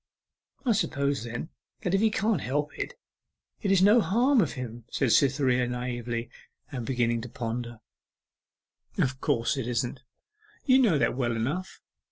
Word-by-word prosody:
'I 245 Hz, -, +3 dB
suppose 140 Hz, -, 0 dB
then, 120 Hz, +7 st, -5 dB, 0.3 s
that 180 Hz, -, 0 dB
if 195 Hz, -, +3 dB
he 220 Hz, -, +4 dB
can't 210 Hz, -5 st, 0 dB
help 145 Hz, +3 st, -2 dB
it, -, -, -4 dB, 0.7 s
it 200 Hz, -, 0 dB
is 190 Hz, -1 st, +5 dB
no 215 Hz, +4 st, +6 dB
harm 245 Hz, +6 st, +3 dB
of -, -, -1 dB
him,' 120 Hz, -3 st, -6 dB
said 130 Hz, -4 st, +1 dB
Cytherea 130 Hz, -2 st, +3 dB
naively, 120 Hz, -1 st, -3 dB, 0.4 s
and 125 Hz, -4 st, -5 dB
beginning 120 Hz, -3 st, +1 dB
to 120 Hz, -, -7 dB
ponder. 120 Hz, -2 st, -5 dB, 1.2 s
'Of 130 Hz, 0 st, 0 dB
course 135 Hz, -2 st, +1 dB
it 130 Hz, -3 st, -3 dB
isn't 120 Hz, +1 st, -2 dB, 0.6 s
you 260 Hz, -1 st, +6 dB
know 215 Hz, -, +4 dB
that 115 Hz, -2 st, +1 dB
well 120 Hz, -3 st, 0 dB
enough. 150 Hz, +12 st, -3 dB
130 Hz, 155 wpm, -28 LUFS, 120-185 Hz, 1.2 s, no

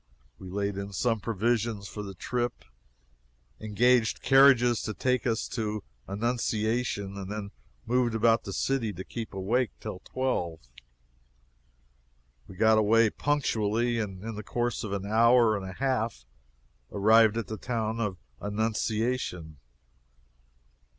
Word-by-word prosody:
We 95 Hz, -, -9 dB
laid 100 Hz, +1 st, -2 dB
in 100 Hz, 0 st, -6 dB
some 115 Hz, +2 st, 0 dB
provisions 110 Hz, -1 st, -1 dB
for 105 Hz, -, -7 dB
the 100 Hz, -2 st, -7 dB
trip, 120 Hz, +6 st, -3 dB, 0.9 s
engaged 115 Hz, +2 st, +2 dB
carriages 130 Hz, -3 st, +5 dB
to 110 Hz, -, -4 dB
take 125 Hz, -1 st, 0 dB
us 115 Hz, -2 st, 0 dB
to 105 Hz, -3 st, -3 dB, 0.2 s
Annunciation, 110 Hz, -1 st, -1 dB
and 100 Hz, 0 st, -6 dB
then 105 Hz, -1 st, -5 dB, 0.3 s
moved 120 Hz, -1 st, +1 dB
about 115 Hz, +1 st, +3 dB
the 100 Hz, -, -6 dB
city, 115 Hz, 0 st, -1 dB
to 95 Hz, -, -7 dB
keep 115 Hz, +2 st, -6 dB
awake, 105 Hz, +5 st, 0 dB
till 105 Hz, -4 st, -6 dB
twelve. 110 Hz, -12 st, -2 dB, 1.9 s
We 95 Hz, -, -12 dB
got 110 Hz, +3 st, +4 dB
away 110 Hz, +1 st, +4 dB
punctually, 120 Hz, -5 st, 0 dB
and 95 Hz, -3 st, -5 dB
in 115 Hz, 0 st, -5 dB
the 105 Hz, -, -6 dB
course 120 Hz, +2 st, -2 dB
of 105 Hz, -, -5 dB
an 100 Hz, -1 st, -3 dB
hour 115 Hz, +1 st, +4 dB
and 95 Hz, -2 st, -5 dB
a -, -, -7 dB
half 115 Hz, -, -1 dB, 0.7 s
arrived 110 Hz, +2 st, +5 dB
at 115 Hz, -, -1 dB
the 110 Hz, -, -6 dB
town 115 Hz, -1 st, -2 dB
of 105 Hz, -5 st, -2 dB, 0.2 s
Annunciation. 105 Hz, -, -2 dB
110 Hz, 130 wpm, -28 LUFS, 100-120 Hz, 1.9 s, carriages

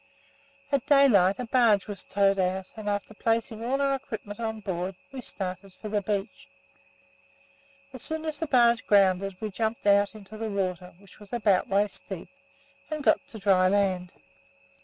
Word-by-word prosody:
At 280 Hz, -2 st, 0 dB
daylight 235 Hz, -10 st, +5 dB
a 250 Hz, -, -4 dB
barge 230 Hz, -4 st, +3 dB
was 205 Hz, -3 st, -6 dB
towed 195 Hz, 0 st, +2 dB
out 185 Hz, 0 st, -1 dB
and, 215 Hz, -2 st, -4 dB
after 205 Hz, +1 st, -3 dB
placing 225 Hz, 0 st, -1 dB
all 260 Hz, +4 st, 0 dB
our 275 Hz, -1 st, +2 dB
equipment 220 Hz, -6 st, -6 dB
on 220 Hz, -1 st, -3 dB
board, 190 Hz, -2 st, -3 dB, 0.2 s
we 265 Hz, -1 st, -6 dB
started 185 Hz, -3 st, -6 dB
for 215 Hz, -, -8 dB
the 205 Hz, -1 st, 0 dB
beach. 200 Hz, +1 st, -4 dB, 1.5 s
As 260 Hz, -, -8 dB
soon 315 Hz, 0 st, -4 dB
as 310 Hz, -2 st, -3 dB
the 325 Hz, -, -2 dB
barge 235 Hz, -4 st, +3 dB
grounded, 195 Hz, -1 st, +3 dB
we 215 Hz, -1 st, -4 dB
jumped 220 Hz, +2 st, -2 dB
out 200 Hz, +1 st, +4 dB
into 215 Hz, 0 st, -11 dB
the 225 Hz, 0 st, -3 dB
water 185 Hz, -3 st, -3 dB
(which 200 Hz, +2 st, -19 dB
was 205 Hz, -1 st, -15 dB
about 210 Hz, -6 st, +2 dB
waist 200 Hz, +1 st, 0 dB
deep) 190 Hz, -4 st, -6 dB, 0.6 s
and 305 Hz, -2 st, -4 dB
got 275 Hz, -, +3 dB
to 240 Hz, -, -10 dB
dry 190 Hz, -2 st, +3 dB
land. 185 Hz, -2 st, +1 dB
205 Hz, 170 wpm, -27 LUFS, 195-235 Hz, 1.5 s, daylight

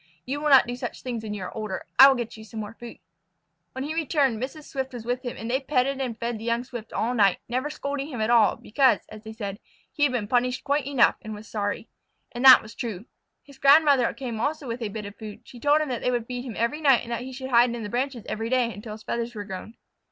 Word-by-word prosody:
You 280 Hz, +3 st, -3 dB
will 300 Hz, -, +1 dB
not 270 Hz, -2 st, +8 dB
do 245 Hz, 0 st, -4 dB
such 250 Hz, -, -6 dB
things 240 Hz, -3 st, -4 dB
when 210 Hz, -1 st, -5 dB
you 195 Hz, -, -5 dB
are -, -, -7 dB
older. 215 Hz, -4 st, -4 dB
I 270 Hz, -, +12 dB
will 270 Hz, -, +4 dB
get 240 Hz, -2 st, -4 dB
you 220 Hz, -, -11 dB
some 220 Hz, 0 st, -8 dB
more 210 Hz, 0 st, -6 dB
food." 235 Hz, 0 st, -10 dB, 0.8 s
When 260 Hz, -, -4 dB
he 300 Hz, +2 st, -3 dB
returned 285 Hz, -7 st, +1 dB
Mrs. 280 Hz, +4 st, -5 dB
Swift 265 Hz, -2 st, -5 dB
was 235 Hz, -2 st, -7 dB
with 245 Hz, +1 st, -1 dB
him, 245 Hz, -2 st, -6 dB
and 225 Hz, -, -6 dB
they 255 Hz, +3 st, +1 dB
petted 270 Hz, -1 st, 0 dB
and 240 Hz, -4 st, -3 dB
fed 235 Hz, -1 st, -3 dB
the -, -, -9 dB
young 235 Hz, +1 st, 0 dB
Swift 240 Hz, -3 st, -9 dB
all 235 Hz, +3 st, -1 dB
night, 200 Hz, -6 st, +4 dB
never 255 Hz, +5 st, -2 dB
scolding 280 Hz, -1 st, -4 dB
him 260 Hz, -7 st, -6 dB
at 215 Hz, +2 st, +1 dB
all, 230 Hz, -3 st, +5 dB
because, 260 Hz, +4 st, +2 dB
as 215 Hz, 0 st, -11 dB
they 220 Hz, -, -8 dB
said, 205 Hz, -2 st, -6 dB, 0.3 s
he -, -, -9 dB
had 290 Hz, -2 st, +4 dB
been 235 Hz, -5 st, -2 dB
punished 250 Hz, +2 st, +1 dB
quite 285 Hz, -1 st, 0 dB
enough 270 Hz, -4 st, +3 dB
and 215 Hz, 0 st, -7 dB
was 210 Hz, +1 st, -11 dB
sorry. 205 Hz, +1 st, -3 dB, 0.4 s
And 240 Hz, 0 st, -5 dB
that 260 Hz, -1 st, +10 dB
was 220 Hz, -, -11 dB
true. 220 Hz, -4 st, -5 dB, 0.4 s
His 280 Hz, -2 st, -17 dB
grandmother 280 Hz, -3 st, +5 dB
came 240 Hz, -5 st, -6 dB
also 290 Hz, +3 st, -2 dB
with 235 Hz, +1 st, -4 dB
a 220 Hz, -, -2 dB
bit 210 Hz, 0 st, -6 dB
of 205 Hz, 0 st, -9 dB
food. 215 Hz, -2 st, -9 dB
She 245 Hz, -, -13 dB
told 295 Hz, +4 st, +3 dB
him 305 Hz, -, -2 dB
that 245 Hz, -2 st, -3 dB
they -, -, +1 dB
would 240 Hz, -2 st, -1 dB
feed 245 Hz, +1 st, -5 dB
him 235 Hz, -5 st, -6 dB
every 235 Hz, +7 st, -1 dB
night 270 Hz, -5 st, +4 dB
and 235 Hz, -, -8 dB
that 235 Hz, -, -2 dB
he 260 Hz, +1 st, -7 dB
should 260 Hz, 0 st, -7 dB
hide 240 Hz, +1 st, +6 dB
in 235 Hz, -, -5 dB
the -, -, -4 dB
branches 245 Hz, +1 st, -3 dB
each 225 Hz, +1 st, -3 dB
day 245 Hz, -2 st, +1 dB
until 210 Hz, +1 st, -8 dB
his 215 Hz, -, -11 dB
feathers 235 Hz, 0 st, -3 dB
were 205 Hz, -, -4 dB
grown. 195 Hz, +3 st, -8 dB
240 Hz, 270 wpm, -25 LUFS, 220-265 Hz, 0.8 s, I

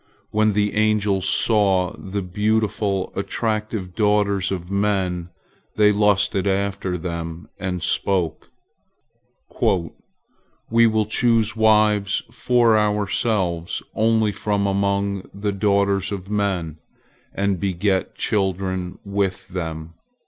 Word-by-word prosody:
When 110 Hz, 0 st, +2 dB
the 105 Hz, 0 st, +1 dB
angels 105 Hz, -3 st, +1 dB
saw 95 Hz, -5 st, +2 dB
the 100 Hz, +1 st, -5 dB
beautiful, 105 Hz, 0 st, -1 dB
attractive 110 Hz, -2 st, -2 dB
daughters 105 Hz, -2 st, +1 dB
of 90 Hz, -1 st, -4 dB
men, 95 Hz, -4 st, 0 dB, 0.5 s
they 105 Hz, -1 st, +5 dB
lusted 100 Hz, -1 st, +2 dB
after 100 Hz, -1 st, -1 dB
them, 85 Hz, -1 st, -6 dB
and 90 Hz, -3 st, -3 dB
spoke: 90 Hz, -4 st, 0 dB, 1.1 s
"We 105 Hz, +5 st, -1 dB
will 110 Hz, -1 st, +1 dB
choose 115 Hz, 0 st, +2 dB
wives 105 Hz, -2 st, +3 dB
for 120 Hz, -2 st, +3 dB
ourselves 100 Hz, -4 st, 0 dB
only 110 Hz, -1 st, +2 dB
from 100 Hz, 0 st, -1 dB
among 100 Hz, 0 st, -1 dB
the 100 Hz, +1 st, -2 dB
daughters 100 Hz, -1 st, +1 dB
of 100 Hz, 0 st, -6 dB
men, 95 Hz, -7 st, -1 dB, 0.5 s
and 100 Hz, -2 st, -1 dB
beget 95 Hz, +1 st, -1 dB
children 95 Hz, -2 st, -1 dB
with 100 Hz, -2 st, -2 dB
them." 80 Hz, -3 st, -5 dB
100 Hz, 100 wpm, -22 LUFS, 95-105 Hz, 1.1 s, they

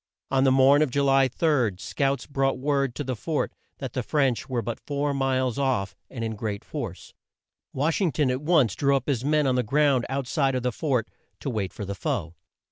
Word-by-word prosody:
On 135 Hz, 0 st, +3 dB
the 135 Hz, -, +5 dB
morn 135 Hz, +2 st, +6 dB
of 155 Hz, -, +3 dB
Ju 140 Hz, +3 st, 0 dB
ly 135 Hz, -1 st, +4 dB
3, 130 Hz, -, +1 dB
scouts 135 Hz, +5 st, -1 dB
brought 135 Hz, -1 st, 0 dB
word 140 Hz, -2 st, 0 dB
to 145 Hz, -, -3 dB
the 130 Hz, -2 st, -3 dB
fort 155 Hz, +6 st, -2 dB, 0.2 s
that 130 Hz, -4 st, -6 dB
the 130 Hz, -, -1 dB
French 135 Hz, -1 st, 0 dB
were 120 Hz, -3 st, -1 dB
but 115 Hz, +1 st, -4 dB
four 145 Hz, 0 st, -2 dB
miles 130 Hz, -2 st, 0 dB
off, 130 Hz, -8 st, 0 dB
and 115 Hz, -3 st, -5 dB
in 110 Hz, -1 st, -3 dB
great 105 Hz, -2 st, -4 dB
force. -, -, -6 dB, 0.6 s
Wash 155 Hz, +8 st, 0 dB
ing 180 Hz, -5 st, +2 dB
ton 130 Hz, 0 st, +1 dB
at 130 Hz, +1 st, -2 dB
once 150 Hz, -, +3 dB
drew 140 Hz, -1 st, +2 dB
up 135 Hz, -, -1 dB
his 130 Hz, -5 st, 0 dB
men 150 Hz, +1 st, +2 dB
on 130 Hz, -, +2 dB
the 125 Hz, -, +2 dB
ground 135 Hz, +1 st, +2 dB
out 135 Hz, 0 st, -2 dB
side 135 Hz, -1 st, +1 dB
of 125 Hz, -, -1 dB
the 125 Hz, -, +1 dB
fort, 125 Hz, -2 st, -1 dB, 0.3 s
to 135 Hz, -, -2 dB
wait 100 Hz, -5 st, -2 dB
for 105 Hz, -, -6 dB
the 100 Hz, -, -4 dB
foe. 85 Hz, -3 st, -3 dB
135 Hz, 220 wpm, -26 LUFS, 120-140 Hz, 0.6 s, morn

